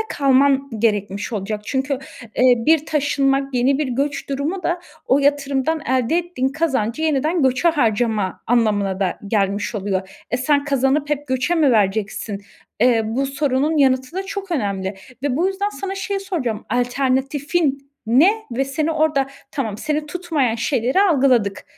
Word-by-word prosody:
kalman 275 0 +3
gerekmiş 205 -1 -1
olacak. 210 0 -3
Çünkü, 265 +3 -2 0.4
eee, 250 -1 +6
bir 315 -1 +4
taşınmak 275 -2 +1
yeni 265 +3 +2
bir 300 - -1
göç 280 +3 -2
durumu 295 +7 -2
da 345 +1 -1 0.3
o 265 - +4
yatırımdan 285 +2 +1
elde 260 +3 +1
ettiğin 340 -7 -1
kazancı 275 -4 -1
yeniden 310 +2 +1
göçe 260 +6 +3
harcama 220 - 0
anlamına 205 -5 +1
da 185 -2 -1
gelmiş 200 +1 0
oluyor. 190 -2 -2 0.2
E, 245 - +1
sen 285 +2 +1
kazanıp 280 +1 +1
hep 290 0 -1
göçe 260 +6 0
mi 295 -6 +3
vereceksin? 205 0 0 0.4
Eee, 235 -2 +4
bu 245 +5 -1
sorunun 280 +2 0
yanıtı 260 0 +2
da 385 - -1
çok 390 -1 -6
önemli 200 - -2 0.3
ve 280 -2 0
bu 350 +4 +2
yüzden 390 +1 -1
sana 390 -1 -5
şeyi 390 0 -3
soracağım: 260 - -3
Alternatifin 275 +4 0 0.2
ne 275 - +5 0.2
ve 260 +3 0
seni 305 +4 -1
orada, 305 -3 +1 0.2
tamam, 220 -7 -3
seni 300 0 -2
tutmayan 305 -8 -1
şeyleri 245 - +1
algıladık, 255 - +2
270 Hz, 150 wpm, -20 LUFS, 235-300 Hz, 0.4 s, eee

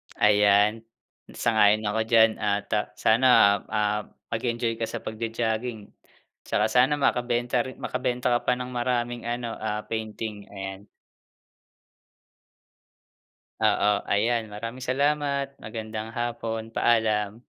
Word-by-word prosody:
Ayan, 105 +1 +4 0.6
sang-ayon 110 -1 +3
ako 105 +1 -1
diyan 115 -1 +4
at 100 -1 -1 0.2
sana, 115 +4 +3 0.4
ah, 105 0 -1 0.2
mag-enjoy 115 0 -1
ka 115 - -1
sa - - -6
pag-jo-jogging 110 0 -3 0.6
'tsaka 110 - +1
sana 125 +5 +4
makabenta 125 -3 0
rin 130 - -8
makabenta 125 0 -2
ka 120 - +3
pa 125 - +4
ng 125 0 -6
maraming 120 -1 -2
ano, 120 0 -3
ah, 105 -1 -3
painting, 110 -2 -5
ayan. 95 0 -8 2.8
Oo, 105 0 +2
ayan 115 +1 +1
maraming 115 +5 -6
salamat, 140 +1 0
magandang 110 0 -6
hapon. 115 -1 -4
Paalam. 110 -1 +1
115 Hz, 105 wpm, -26 LUFS, 105-120 Hz, 2.8 s, Ayan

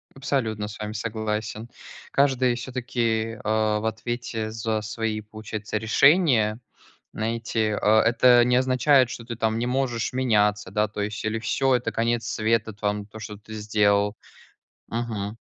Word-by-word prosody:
Абсолютно 115 -6 -2
с 105 - -9
вами 105 0 -4
согласен. 110 0 -3 0.4
Каждый 130 -3 +2
всё-таки, 115 -3 -2
а, 110 0 +1
в 110 - -5
ответе 110 0 -3
за 110 -1 -2
свои, 110 0 -3
получается, 110 0 -5
решения, 115 - +4 0.5
знаете. 110 -1 -1
А 110 +1 +5
это 120 +1 +5
не 125 0 +3
означает, 130 0 +4
что 115 - -7
ты 115 0 -5
там 110 -1 0
не 120 - -1
можешь 125 -3 -1
меняться, 105 -6 +1
да, 105 +2 +1
то 105 0 -5
есть, 105 +1 -4
или 110 +1 -1
всё, 130 +4 +1
это 120 -2 -1
конец 115 0 0
света 110 0 0
т 100 - -25
вам 105 -1 -1
то, 110 +1 -12
что 105 0 -7
ты 110 +1 -12
сделал, 105 -1 +1 0.7
мгм. 110 -3 -3
110 Hz, 150 wpm, -25 LUFS, 105-120 Hz, 0.7 s, А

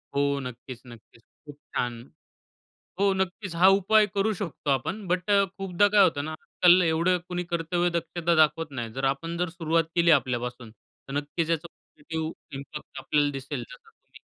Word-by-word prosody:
हो, 140 - +2 0.2
नक्कीच, 125 0 -8
नक्कीच. 115 0 -15 0.2
खूप 145 -1 -10 0.2
छान! 120 -1 0 1.1
हो, 200 -1 +3
नक्कीच 190 -1 -3
हा 180 +3 +6
उपाय 215 +2 +4
करू 210 +2 +2
शकतो 175 -6 -5
आपण, 190 - -2
बट 180 +3 -1
अ, 200 -1 +5
खूपदा 195 +1 +2
काय 200 - +8
होतं 145 -5 +1
ना, 155 - -4
आजकाल 180 +1 +5
एवढं 170 +3 +2
कुणी 180 0 -3
कर्तव्य 175 +1 0
दक्षता 170 +1 -1
दाखवत 155 0 +1
नाही. 115 -1 -4
जर 135 +1 -2
आपण 165 +4 -6
जर 180 -1 -1
सुरुवात 165 0 +2
केली 170 -1 +4
आपल्यापासून, 120 -2 -5
तर 135 +4 -15
नक्कीच 160 +3 -3
याचा 165 0 -1
पॉझिटिव्ह 160 +1 -6 0.2
इम्पॅक्ट 140 +2 -8
आपल्याला 145 -1 +2
दिसेल, 130 - -5
जसं - - -14
तुम्ही - - -20
165 Hz, 170 wpm, -26 LUFS, 145-185 Hz, 1.1 s, काय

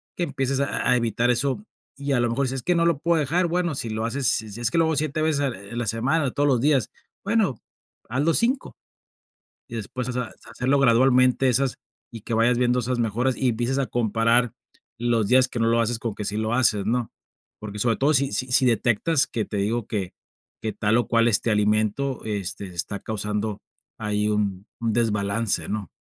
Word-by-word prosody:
que 175 - -2
empieces 135 -3 -1
a 140 - -1
a 125 - +5
evitar 120 0 +1
eso. 135 - +1 0.3
Y 140 0 -2
a 125 - +2
lo 120 - +1
mejor 130 +3 0
si - - -3
dices: 135 - -2
"Es - - -32
que 180 - +2
no 170 0 +2
lo 165 -5 +2
puedo 170 0 +2
dejar", 165 +5 +1
bueno, 170 -2 -1
si 115 - -3
lo 110 +1 -2
haces, 130 +4 -2
si 110 -2 0
si 115 +4 -8
es 115 0 0
que - - 0
lo 165 - +4
hago 160 -1 0
7 155 +1 -1
veces 155 -2 +1
en 135 -3 0
en 100 +5 -9
la 120 - -1
semana, 130 +9 +1
o 130 - -1
todos 145 0 +1
los 125 -3 +3
días, 140 -4 +2 0.3
bueno, 200 - 0 0.5
hazlo 145 +7 +1
5. 255 +3 0 0.9
Y 120 - -8
después, 125 +3 -5
o - - -1
sea, 125 0 -1
hacer - - -15
hacerlo 130 +3 +1
gradualmente 130 +1 +4
esas 130 +1 +1 0.3
y 115 -3 -9
que 115 - -5
vayas 120 +2 +3
viendo 125 0 +2
esas 120 +1 -2
mejoras, 120 +3 0
y 130 - +1
empieces 120 +4 -1
a 135 - 0
comparar 115 +1 +1 0.5
los 120 -2 +1
días 130 +2 +5
que 125 - -7
no 115 - +2
lo 115 0 +3
haces, 115 0 0
con 115 -2 -3
que 105 - -5
sí 105 +1 -2
lo 110 +1 -1
haces, 110 -5 +2
¿no? 120 +1 -1 0.5
Porque 105 -1 -7
sobre 115 +1 +2
todo 145 +3 +2
si 140 0 +2
si 130 0 -2
si 130 - +4
detectas 120 +6 +2
que 110 - -2
te 105 - -5
digo, 110 +3 -1
que 95 -4 -3 0.5
que 110 - -2
tal, 105 +2 +1
o 120 - 0
cual, 115 0 +3
este 115 +1 +2
alimento, 110 +5 +1
este, 100 -2 -4
está 90 +3 -4
causando 105 0 -3 0.4
ahí 105 0 -1
un 100 -2 -1
un 115 -2 0
desbalance, 105 -5 0
¿no? 105 -4 -3
120 Hz, 220 wpm, -24 LUFS, 110-135 Hz, 0.9 s, a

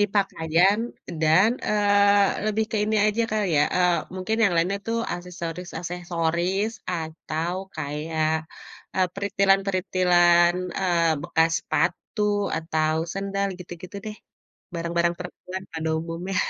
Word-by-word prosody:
Dipakaian 195 -2 +2 0.4
dan, 165 +8 +5 0.2
eee, 205 -1 +4 0.2
lebih 215 +1 +1
ke 225 - -1
ini 215 +1 0
aja 215 +2 +1
kali 215 -2 +1
ya, 145 - +5
eee, 180 -1 +4 0.2
mungkin 185 +4 -2
yang 200 - +3
lainnya 185 +4 +1
tuh 230 0 0 0.2
aksesoris-aksesoris 175 +2 -3 0.2
atau 160 0 -3 0.2
kayak, 155 +1 -2 0.7
eee, 185 -1 +3
peritilan-peritilan, 185 -3 +3 0.3
eee, 170 -3 +2
bekas 160 +2 +2
sepatu 180 +4 -1 0.4
atau 155 -1 0 0.2
sendal 195 0 -1
gitu-gitu 180 +1 -9
deh, 215 - -6 0.6
barang-barang 170 0 0
perempuan 180 +1 -7
pada 160 0 -2
umumnya. 170 +3 -5
180 Hz, 110 wpm, -24 LUFS, 165-200 Hz, 0.7 s, dan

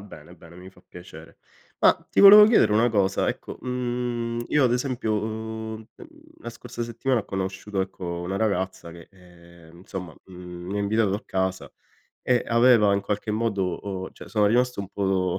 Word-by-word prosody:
bene, 90 -4 -13
bene, 85 +1 -16
mi 90 +1 -12
fa 90 - -22
piacere. 80 -2 -13 0.4
Ma - - +6 0.2
ti - - +1
volevo 210 +1 +10
chiedere 220 - +4
una 115 +3 +3
cosa: 100 -3 0
ecco, - - -6
mhmm, 120 -2 -3
io 150 - +2
ad 120 - +2
esempio, 125 -3 -1
uhm, 110 0 -6
mhmm, - - -12 0.3
la 120 - -8
scorsa 120 0 -7
settimana 120 +1 -1
ho - - -12
conosciuto 95 +1 -4
ecco 95 0 -5 0.2
una 95 +3 -4
ragazza 95 -5 -2
che, 85 0 -14
ehm, 85 -3 -18
insomma, 90 -3 -8
mhmm, 90 -1 -10
mi 100 - -3
ha - - 0
invitato 100 -1 +1
a 105 - -5
casa 95 0 -3 0.5
e 125 -1 +1
aveva 115 -3 +4
in 100 - 0
qualche 105 +2 -3
modo 100 -5 -1
uhm, 95 -2 -6
cioè - - -13
sono 105 -2 +2
rimasto 125 0 +1
un 100 - -7
po' 100 - -4
do 95 -1 0
100 Hz, 185 wpm, -24 LUFS, 95-115 Hz, 0.5 s, volevo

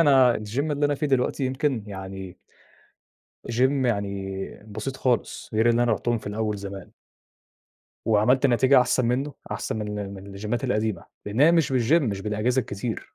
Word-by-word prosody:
أنا 135 -5 +6
الgym 105 +3 -5
اللي 145 0 +1
أنا 145 - 0
فيه 150 +2 -1
دلوقتي 135 0 +1
يمكن 130 -3 -1
يعني 95 -2 -7 1.1
gym 130 +3 +2
يعني 100 -3 -2 0.3
بسيط 110 +6 -5
خالص، 125 -3 -1
غير 110 +2 +3
اللي 120 +1 +3
أنا 120 -2 +2
رُحتهم 120 +3 0
في - - -13
الأول 105 0 -2
زمان. 100 -2 -8 1.1
وعملت 120 +5 +4
نتيجة 130 +1 +5
أحسن 125 -1 +2
مِنُّه 135 +4 -1 0.2
أحسن - - -3
من 105 -1 -4
ال 100 -1 -5
من 95 0 -10
الجيمّات 105 +4 -3
القديمة، 110 0 -1 0.2
لأن 105 +5 -2
هي 160 +3 +7
مش 165 -4 +2
بالgym 125 +2 +2
مش 100 -7 -2
بالأجهزة 105 +5 0
الكتير. 110 0 -5
115 Hz, 165 wpm, -25 LUFS, 105-130 Hz, 1.1 s, هي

